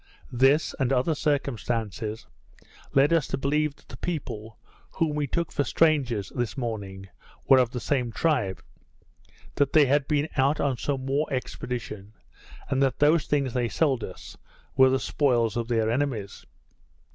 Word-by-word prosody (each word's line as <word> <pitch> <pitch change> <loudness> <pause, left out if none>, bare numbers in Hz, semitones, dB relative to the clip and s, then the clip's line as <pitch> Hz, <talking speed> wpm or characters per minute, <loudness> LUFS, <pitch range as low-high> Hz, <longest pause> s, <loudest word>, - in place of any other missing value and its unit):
This, 135 +5 +3
and 135 -2 +1
other 135 +5 +2
circumstances, 115 - -2 0.7
led 140 +4 +5
us 165 -4 +2
to - - -2
believe 145 +2 0
that - - -25
the 125 - -10
people, 115 - -5 0.4
whom 155 -2 0
we 150 -1 -1
took 170 +5 -2
for 145 - 0
strangers 130 - +1
this 120 -1 -2
morning, 100 -6 -5 0.4
were 135 - +7
of 125 -2 +2
the 125 - -5
same 125 -2 -1
tribe; 100 - 0 0.9
that 140 -1 +1
they 155 -2 +7
had 140 +1 +2
been 150 0 +1
out 140 +3 +2
on 140 -2 +1
some 135 +1 -3
war 140 +3 0
expedition; 115 -5 -5 0.5
and 135 0 0
that 135 -1 +2
those 150 +2 +3
things 140 -4 0
they 120 -2 0
sold 135 -6 +1
us, 90 - -9 0.4
were 130 -1 +6
the 130 0 +1
spoils 120 -8 +1
of 120 -1 -2
their 115 -2 +1
enemies. 120 -6 -3
130 Hz, 155 wpm, -26 LUFS, 115-145 Hz, 0.9 s, were